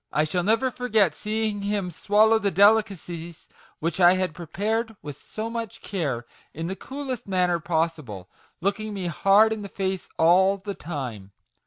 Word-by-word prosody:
te -, -, -59 dB
I 150 Hz, -, +3 dB
shall 165 Hz, +4 st, -1 dB
never 225 Hz, +7 st, +2 dB
forget 220 Hz, -9 st, +2 dB
seeing 215 Hz, +2 st, -2 dB
him 200 Hz, -3 st, -2 dB
swallow 215 Hz, +5 st, +3 dB
the 205 Hz, -2 st, +1 dB
delicacies 190 Hz, -4 st, +1 dB, 0.3 s
which 165 Hz, +2 st, -3 dB
I 175 Hz, 0 st, +7 dB
had 185 Hz, -3 st, -1 dB
prepared 215 Hz, +7 st, -2 dB
with 145 Hz, -2 st, -6 dB
so 220 Hz, +9 st, -6 dB
much 230 Hz, -1 st, -5 dB
care, 140 Hz, -, -2 dB, 0.3 s
in 165 Hz, +2 st, -4 dB
the 190 Hz, +3 st, -3 dB
coolest 265 Hz, -1 st, -6 dB
manner 180 Hz, -3 st, +1 dB
possible, 155 Hz, -, -2 dB, 0.3 s
looking 205 Hz, +3 st, -2 dB
me 190 Hz, -2 st, -4 dB
hard 195 Hz, +6 st, +4 dB
in 220 Hz, -, -5 dB
the 200 Hz, -, -7 dB
face 190 Hz, -1 st, -3 dB
all 190 Hz, +4 st, +5 dB
the 200 Hz, +1 st, -6 dB
time. 125 Hz, -, -6 dB
190 Hz, 165 wpm, -25 LUFS, 165-215 Hz, 0.3 s, I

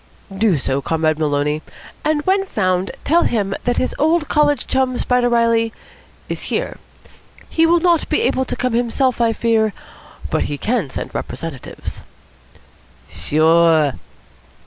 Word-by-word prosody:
"Do 200 Hz, -4 st, +2 dB
so, 135 Hz, 0 st, -1 dB
Comrade 155 Hz, 0 st, 0 dB
Maloney. 150 Hz, 0 st, 0 dB, 0.4 s
And 305 Hz, -1 st, +1 dB
when 385 Hz, +3 st, +2 dB
found, 185 Hz, -, 0 dB
tell 335 Hz, +4 st, +3 dB
him 205 Hz, -, 0 dB
that 245 Hz, -1 st, +1 dB
his -, -, 0 dB
old 315 Hz, +1 st, +2 dB
college 295 Hz, -1 st, +2 dB
chum, 260 Hz, -1 st, 0 dB
Spider 250 Hz, -1 st, +1 dB
Reilly, 230 Hz, -1 st, +2 dB, 0.6 s
is -, -, -5 dB
here. -, -, -2 dB, 0.7 s
He 325 Hz, 0 st, +3 dB
will 340 Hz, +1 st, +4 dB
not 340 Hz, -1 st, +2 dB
be -, -, +1 dB
able 260 Hz, -, +1 dB
to -, -, -4 dB
come 250 Hz, -1 st, -1 dB
himself, 245 Hz, +1 st, +1 dB
I 230 Hz, -1 st, +3 dB
fear, 225 Hz, -2 st, +1 dB, 0.6 s
but -, -, +1 dB
he 145 Hz, -, -4 dB
can 215 Hz, -, -1 dB
send -, -, -6 dB
representatives." 160 Hz, -6 st, -6 dB, 1.1 s
"Sure." 160 Hz, -1 st, +3 dB
230 Hz, 140 wpm, -19 LUFS, 165-265 Hz, 1.1 s, will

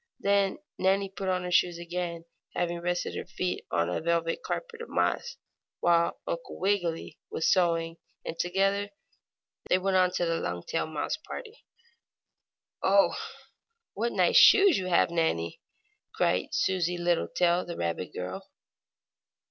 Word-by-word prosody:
Then 200 Hz, -1 st, +2 dB, 0.2 s
Nannie 195 Hz, +1 st, +2 dB
put 190 Hz, 0 st, -4 dB
on 185 Hz, -1 st, 0 dB
her 180 Hz, -, -4 dB
shoes 175 Hz, 0 st, +3 dB
again, 170 Hz, -1 st, -4 dB, 0.3 s
having 175 Hz, -1 st, -1 dB
rested 175 Hz, +1 st, -2 dB
her -, -, -3 dB
feet 180 Hz, 0 st, -3 dB
on 85 Hz, -, +1 dB
a 90 Hz, -, -2 dB
velvet 165 Hz, 0 st, 0 dB
carpet 470 Hz, -1 st, -5 dB
of 465 Hz, -, -8 dB
moss, 480 Hz, -, -1 dB, 0.4 s
while 170 Hz, -1 st, +2 dB
Uncle 170 Hz, 0 st, -5 dB
Wiggily 180 Hz, -4 st, -1 dB
was 160 Hz, -, +1 dB
sewing, 165 Hz, -2 st, +1 dB, 0.3 s
and -, -, -4 dB
together 195 Hz, +3 st, +1 dB, 0.8 s
they -, -, +5 dB
went 190 Hz, 0 st, +1 dB
on 185 Hz, 0 st, +4 dB
to 175 Hz, -, 0 dB
the 165 Hz, 0 st, 0 dB
Longtail 90 Hz, -, -3 dB
mouse 155 Hz, -2 st, -3 dB
party. 440 Hz, +8 st, -10 dB, 1.2 s
"Oh, 195 Hz, +1 st, +4 dB, 0.8 s
what 235 Hz, +3 st, -1 dB
nice 180 Hz, -3 st, +3 dB
shoes 395 Hz, -5 st, +7 dB
you 185 Hz, -, -4 dB
have, 170 Hz, -1 st, +3 dB
Nannie!" 125 Hz, -, -1 dB, 0.5 s
cried 90 Hz, -, +1 dB
Susie 180 Hz, -2 st, +1 dB
Littletail, 175 Hz, 0 st, +1 dB
the 170 Hz, -, -6 dB
rabbit 85 Hz, +1 st, -3 dB
girl. 90 Hz, +1 st, -6 dB
175 Hz, 140 wpm, -28 LUFS, 170-190 Hz, 1.2 s, shoes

